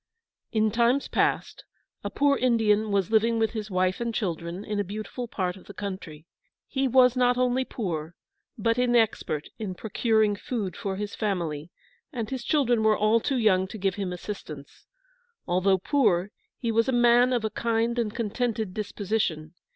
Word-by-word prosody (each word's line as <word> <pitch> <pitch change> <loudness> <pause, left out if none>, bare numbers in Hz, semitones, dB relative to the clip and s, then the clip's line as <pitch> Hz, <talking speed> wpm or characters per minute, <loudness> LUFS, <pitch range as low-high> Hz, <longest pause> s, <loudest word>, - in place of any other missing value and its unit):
In 220 -2 +2
Times 240 +5 +2
past, - - 0 0.4
a - - -2
poor 285 -1 +2
Indian 220 -4 +2
was 200 +1 +1
living 225 +1 +3
with 225 -1 +1
his 215 -2 -5
wife 185 +2 0
and 235 0 -1
children 175 -1 -3
in 210 -1 -2
a - - +1
beautiful 215 +5 -6
part 185 -5 -2
of 190 - -15
the 205 - -11
country. 185 -6 -6 0.4
He 270 0 0
was 255 0 +5
not 250 -1 +3
only 255 +1 +1
poor, 170 -9 -4 0.4
but 230 +1 +1
inexpert 225 -11 +1
in 200 -4 -4
procuring 220 0 +1
food 205 -3 -4
for 195 -1 -3
his 205 +1 -4
family, 170 -7 -2 0.4
and 230 -5 -4
his 260 -2 -3
children 245 -6 +2
were 220 -1 +3
all 215 +2 +3
too 270 +3 -1
young 190 -5 +3
to 220 - -8
give 195 -1 0
him 195 -1 -3
assistance. 175 -6 -8 0.6
Although 185 +2 +2
poor, 200 -4 +1 0.3
he 235 -3 -2
was 230 +3 +2
a - - +3
man 240 0 +5
of 240 -3 0
a 215 - -1
kind 230 +1 0
and 220 -3 0
contented 225 -2 -2
disposition. 200 -6 -2
215 Hz, 170 wpm, -26 LUFS, 190-235 Hz, 0.6 s, was